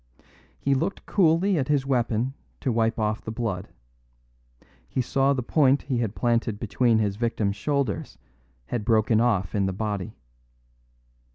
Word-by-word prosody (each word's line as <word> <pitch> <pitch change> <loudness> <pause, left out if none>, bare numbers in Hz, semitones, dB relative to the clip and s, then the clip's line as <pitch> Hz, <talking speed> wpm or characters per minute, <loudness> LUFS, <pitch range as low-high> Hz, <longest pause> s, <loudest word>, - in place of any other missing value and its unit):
He 140 - +1
looked 165 +9 -2
coolly 180 0 +3
at 130 - -1
his 145 -2 +1
weapon 125 -1 0 0.3
to 130 - 0
wipe 115 0 +1
off 110 -1 -1
the - - -7
blood; 110 -5 -3 1.2
he - - -3
saw 135 +2 +2
the 130 -3 0
point 140 +1 +3
he 130 -3 -1
had 115 -3 -2
planted 115 -3 0
between 115 +1 +2
his 100 -2 0
victim's 110 -3 0
shoulders 140 -1 -2 0.5
had 115 - -3
broken 110 0 +3
off 105 -7 +1
in 100 -2 +1
the 95 - -2
body. 105 +1 -3
115 Hz, 150 wpm, -25 LUFS, 110-135 Hz, 1.2 s, coolly